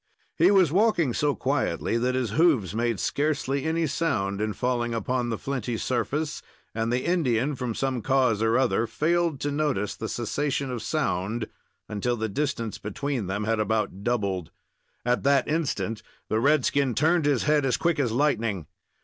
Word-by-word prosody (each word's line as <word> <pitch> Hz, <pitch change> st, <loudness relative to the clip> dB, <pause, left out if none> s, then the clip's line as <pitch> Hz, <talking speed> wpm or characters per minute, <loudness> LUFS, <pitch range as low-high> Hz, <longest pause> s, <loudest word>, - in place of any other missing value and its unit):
He 170 Hz, +3 st, +5 dB
was 190 Hz, -7 st, +5 dB
walking 180 Hz, -, +3 dB
so 145 Hz, +1 st, +1 dB
quietly 110 Hz, -, -1 dB
that 125 Hz, +2 st, +1 dB
his 125 Hz, -5 st, -1 dB
hoofs 125 Hz, -, +3 dB
made 115 Hz, -1 st, 0 dB
scarcely 145 Hz, -1 st, -1 dB
any 165 Hz, +1 st, +1 dB
sound 110 Hz, -10 st, -1 dB
in 110 Hz, 0 st, -1 dB
falling 120 Hz, +1 st, -1 dB
upon 120 Hz, +2 st, -1 dB
the 115 Hz, -, -2 dB
flinty 125 Hz, -4 st, -3 dB
surface, 135 Hz, +7 st, -2 dB, 0.3 s
and 115 Hz, +1 st, -1 dB
the 125 Hz, +1 st, 0 dB
Indian, 145 Hz, -6 st, +1 dB
from 125 Hz, -4 st, -3 dB
some 130 Hz, -3 st, -1 dB
cause 125 Hz, -3 st, +2 dB
or 115 Hz, +2 st, +3 dB
other, 120 Hz, -3 st, +2 dB
failed 170 Hz, 0 st, 0 dB
to 145 Hz, -, -1 dB
notice 140 Hz, -9 st, -1 dB
the 110 Hz, -, -5 dB
cessation 140 Hz, +3 st, -2 dB
of 120 Hz, -3 st, -4 dB
sound 110 Hz, -, -1 dB, 0.4 s
until 120 Hz, +4 st, -1 dB
the 110 Hz, 0 st, -2 dB
distance 115 Hz, -2 st, -2 dB
between 115 Hz, +1 st, -3 dB
them 100 Hz, +3 st, -2 dB
had 110 Hz, +1 st, 0 dB
about 105 Hz, -2 st, -1 dB
doubled. 100 Hz, -8 st, -1 dB, 0.6 s
At 125 Hz, 0 st, +2 dB
that 140 Hz, -1 st, +3 dB
instant, 145 Hz, -8 st, -1 dB, 0.3 s
the 110 Hz, -, +1 dB
redskin 140 Hz, -1 st, +2 dB
turned 160 Hz, +4 st, +3 dB
his 140 Hz, -5 st, +2 dB
head 150 Hz, -1 st, +3 dB
as 125 Hz, -2 st, +1 dB
quick 170 Hz, -3 st, +1 dB
as 125 Hz, -5 st, +1 dB
lightning. 115 Hz, -, 0 dB
125 Hz, 165 wpm, -26 LUFS, 110-145 Hz, 0.6 s, He